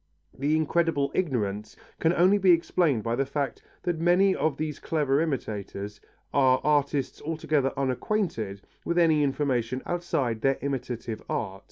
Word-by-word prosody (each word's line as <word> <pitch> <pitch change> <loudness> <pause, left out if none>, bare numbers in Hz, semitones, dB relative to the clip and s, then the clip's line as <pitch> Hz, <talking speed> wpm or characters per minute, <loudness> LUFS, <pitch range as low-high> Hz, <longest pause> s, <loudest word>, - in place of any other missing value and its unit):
This 140 +3 -1
incredible 160 -2 +1
ignorance 105 - -2 0.2
can 165 - +3
only 185 +4 +4
be 190 -1 +3
explained 165 - +3
by 115 0 0
the 135 - +1
fact 140 0 -3 0.2
that 175 -2 -1
many 180 +3 +4
of 155 -3 0
these 155 -2 -3
clever 145 -3 +1
imitators, 105 - -4 0.3
are 130 -2 +4
artists 145 -2 +1
altogether 155 -3 0
unacquainted 130 - -1 0.2
with 170 - -1
any 160 -3 +4
information 130 -3 0
outside 140 -10 -1
their 135 +2 +2
imitative 125 -5 -4
art. 95 -3 -3
140 Hz, 140 wpm, -27 LUFS, 125-165 Hz, 0.3 s, only